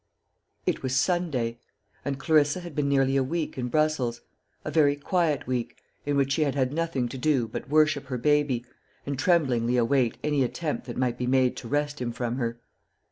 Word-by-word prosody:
It - - 0
was 130 0 -1
Sunday; 130 -8 0 0.4
and 140 -1 -2
Clarissa 150 +3 +2
had 175 -4 -9
been 145 -1 +1
nearly 135 -1 +3
a 135 - +3
week 160 +4 -2
in 125 -2 -3
Brussels 135 -4 0 0.4
a 155 - -3
very 145 -2 +4
quiet 155 0 0
week, 125 -2 -3 0.3
in 145 -1 +1
which 140 -1 +2
she 145 - +1
had 140 -3 +1
had 130 -1 0
nothing 165 -6 -1
to 135 - -7
do 135 -4 +2
but 125 +5 -7
worship 150 -1 +3
her 130 -1 -3
baby, 145 -2 +1 0.4
and 140 -2 -3
tremblingly 130 -8 +2
await 125 0 +2
any 145 -2 +2
attempt 150 +1 -3
that 120 - -6
might 125 -1 0
be 125 - -1
made 130 -1 +3
to - - -7
wrest 145 +1 -1
him 120 -1 -1
from 120 +1 -3
her. 115 -2 -2
140 Hz, 190 wpm, -27 LUFS, 125-150 Hz, 0.4 s, very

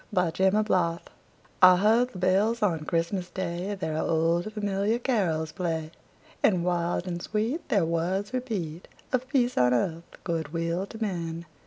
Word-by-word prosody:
CHRISTMAS 190 +4 +2
BELLS 170 -4 +1 0.6
I 185 -1 +9
heard 225 +6 +3
the 195 - -11
bells 200 +5 +2
on 165 -6 +1
Christmas 175 +2 -1
Day 185 +2 -3
Their 160 -4 -3
old, 165 +5 +1
familiar 205 +1 0
carols 185 - 0
play, 160 -3 -3 0.5
And 180 -5 +3
wild 175 0 0
and 175 -2 -4
sweet 225 - -2
The 200 -9 +3
words 180 +6 -1
repeat 195 -10 -4 0.3
Of 255 0 0
peace 250 -2 +1
on 125 0 +4
earth, 165 +5 -3
good 160 -2 -3
will 170 +3 -1
to 220 - -10
men! 170 -5 -3
180 Hz, 150 wpm, -27 LUFS, 165-210 Hz, 0.6 s, I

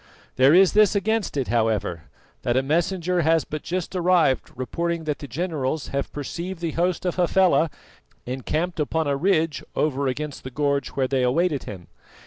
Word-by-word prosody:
There 135 +5 +6
is 190 0 +6
this 210 -1 +5
against 210 -3 0
it, 135 - -1
however, 110 -8 0 0.4
that 120 +1 0
a 130 - +2
messenger 175 +4 0
has 160 0 +3
but 155 -1 -5
just 185 +1 -4
arrived 175 -7 +2
reporting 170 +7 -2
that 150 -2 -2
the 145 - -7
generals 150 0 -2
have 140 0 -3
perceived 170 +5 -5
the 170 -2 -2
host 175 +3 -1
of 180 - -1
Hafela 180 -2 +3 0.6
encamped 155 +8 -2
upon 160 +2 0
a 140 -1 +1
ridge 165 -1 +1
over 140 -2 0
against 145 +3 -4
the 130 - -6
gorge 140 +1 0
where 135 -1 -1
they 135 0 0
awaited 145 +3 +1
him. 90 -4 -9
155 Hz, 170 wpm, -24 LUFS, 135-175 Hz, 0.6 s, There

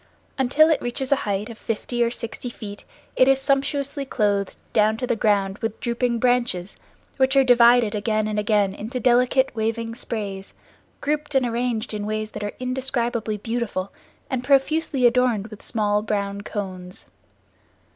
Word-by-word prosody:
Until 290 +5 +4
it 315 - +1
reaches 255 +2 -3
a - - +7
height 200 +1 -1
of 230 - -12
fifty 240 +2 -1
or 230 - +2
sixty 235 +1 -5
feet 205 -3 -9 0.3
it 255 - +5
is 270 0 +4
sumptuously 280 +1 0
clothed 205 -6 0 0.2
down 215 0 +3
to 250 - -2
the 240 -1 0
ground 200 -3 +1
with 225 -2 -3
drooping 235 0 0
branches, 240 -7 0 0.4
which 265 0 +3
are 270 - +6
divided 240 -3 +5
again 215 0 0
and 210 -1 -1
again 205 -2 +2
into 225 +6 -5
delicate 250 +2 +3
waving 225 +1 -2
sprays, 205 -5 -5 0.5
grouped 295 0 -2
and 265 -2 +4
arranged 235 -1 -2
in 210 -1 -3
ways 215 0 -3
that - - -6
are 205 - -3
indescribably 245 -4 -2
beautiful, 225 -3 -3 0.3
and 255 -2 -2
profusely 275 0 +2
adorned 240 -3 +2
with 215 -1 -11
small 210 -2 0
brown 200 -1 -2
cones. 185 -3 -6
230 Hz, 155 wpm, -23 LUFS, 210-255 Hz, 0.5 s, a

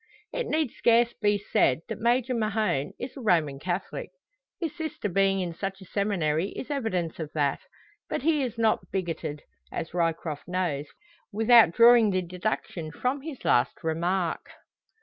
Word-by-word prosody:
It - - -2
need 310 - 0
scarce 235 0 +3
be 205 -1 +1
said 160 -8 +2
that - - -5
Major 245 +2 +2
Mahon 215 - 0
is 255 - -6
a 270 - -8
Roman 160 - +2
Catholic. 180 +4 -4 0.5
His 325 -4 -3
sister 315 -10 -4
being 195 0 +2
in 175 -2 -3
such 195 +2 -4
a 190 - -12
seminary 185 -4 0
is 270 - -6
evidence 185 - -2
of 155 -2 -5
that. 145 -3 +1 0.5
But - - -2
he 310 -1 +3
is 245 -4 -3
not 225 -1 +1
bigoted, 165 -5 -3 0.3
as 160 - -5
Ryecroft 165 -3 -2
knows, 175 -6 -1 0.4
without 225 -3 +6
drawing 235 0 +7
the 185 -1 0
deduction 175 -2 -3
from 255 - -2
his 290 -3 -8
last 120 +2 +2
remark. 170 +2 -1
195 Hz, 155 wpm, -27 LUFS, 165-235 Hz, 0.5 s, drawing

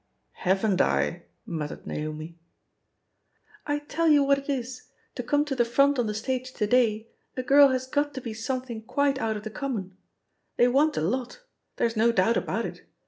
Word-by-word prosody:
"Haven't 190 +1 +1
I 70 +1 0
?" - - -47
muttered 150 -3 -5
NaomL 155 +2 -5 1.3
"I 290 0 +1
tell 300 +3 -1
you 295 -2 +6
what 280 0 +3
it 280 - -12
is, 255 -2 -4 0.3
to - - -4
come 290 +4 +1
to 285 -3 -3
the 240 - +3
front 275 +3 +3
on 235 - +1
the 210 - -3
stage 255 +3 -3
to 210 - -1
day, 225 -1 +2 0.3
a 255 - -1
girl 280 +3 +7
has 260 -1 -1
got 290 +2 -1
to 260 - -4
he 230 -3 -5
something 235 +1 -4
quite 275 +4 0
out 220 -3 -1
of 210 - -9
the 220 - -6
conmoion* 220 -8 -4 0.7
They 245 - +5
want 290 +4 +2
a - - +1
lot 250 - -2
I - - -37 0.3
there's 230 0 0
no 225 +2 +4
doubt 230 +1 +2
about - - -1
it. - - -8
245 Hz, 195 wpm, -26 LUFS, 215-275 Hz, 1.3 s, girl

